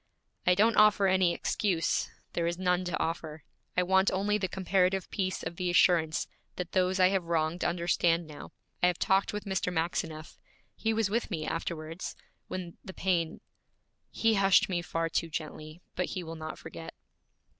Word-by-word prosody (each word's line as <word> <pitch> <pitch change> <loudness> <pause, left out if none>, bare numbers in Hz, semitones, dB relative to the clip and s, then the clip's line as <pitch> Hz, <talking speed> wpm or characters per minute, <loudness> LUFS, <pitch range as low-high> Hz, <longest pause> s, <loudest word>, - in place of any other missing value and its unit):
'I 180 - +6
don't 220 +4 +3
offer 210 -2 +6
any 185 -2 +4
excuse; 175 0 0 0.2
there 170 -1 0
is 170 0 -1
none 180 0 +1
to 180 - -1
offer. 160 -2 -3 0.3
I 180 - +4
want 190 +2 +4
only 205 +2 +1
the 190 - 0
comparative 190 0 +1
peace 185 -2 -2
of 170 - -5
the 180 -1 -1
assurance 170 -3 +3 0.3
that 180 -1 -5
those 185 0 +1
I 185 0 +6
have 190 -3 0
wronged 165 +1 0
understand 170 -1 +1
now. 150 -2 -10 0.3
I 180 - +5
have 180 -1 +1
talked 195 +1 +2
with 210 0 -5
Mr. 190 -2 -1
Maxineff. 160 -2 -3 0.4
He 225 - 0
was 220 -2 +1
with 235 +2 0
me 160 -6 -3
afterwards, 165 +1 -4 0.3
when 180 -2 -6
the 190 - -9
pain 170 -4 0 0.7
He 225 0 +2
hushed 195 -2 +4
me 175 -2 0
far 165 0 -2
too 165 0 -1
gently, 155 +1 -6
but 180 - -1
he 185 - -4
will 165 0 -7
not 155 0 -6
forget. - - -9
180 Hz, 175 wpm, -30 LUFS, 165-190 Hz, 0.7 s, I